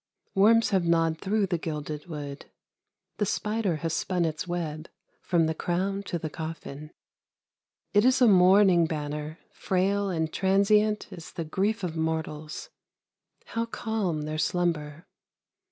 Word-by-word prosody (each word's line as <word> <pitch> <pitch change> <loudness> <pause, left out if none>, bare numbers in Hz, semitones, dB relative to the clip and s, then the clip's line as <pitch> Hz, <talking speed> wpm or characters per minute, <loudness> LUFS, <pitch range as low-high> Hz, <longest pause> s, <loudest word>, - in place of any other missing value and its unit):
Worms 225 +4 +5
have 190 -3 +3
gnawed 165 -1 +2
through 205 +1 +1
the 175 -3 -1
gilded 150 -1 -5
wood; 145 -3 -7 0.7
the 210 - +1
spider 210 -3 0
has 165 - 0
spun 180 0 0
its 160 +2 -3
web 160 -3 -4 0.3
from 170 -3 +2
the 160 - 0
crown 190 +5 -1
to 180 -3 -3
the 160 - -4
coffin. 155 -2 -7 1.0
It 205 0 +5
is 255 +1 +4
a 250 - +6
mourning 185 -3 +6
banner, 150 0 -4
frail 195 +2 0
and 160 -3 -2
transient 210 +2 +3
as 170 - -10
the 165 - -5
grief 200 +6 -1
of 170 -3 -3
mortals. 160 - -3 0.7
How 230 0 -3
calm 210 -9 -2
their 155 +1 -3
slumber! 165 -2 -1
175 Hz, 135 wpm, -27 LUFS, 155-200 Hz, 1.0 s, a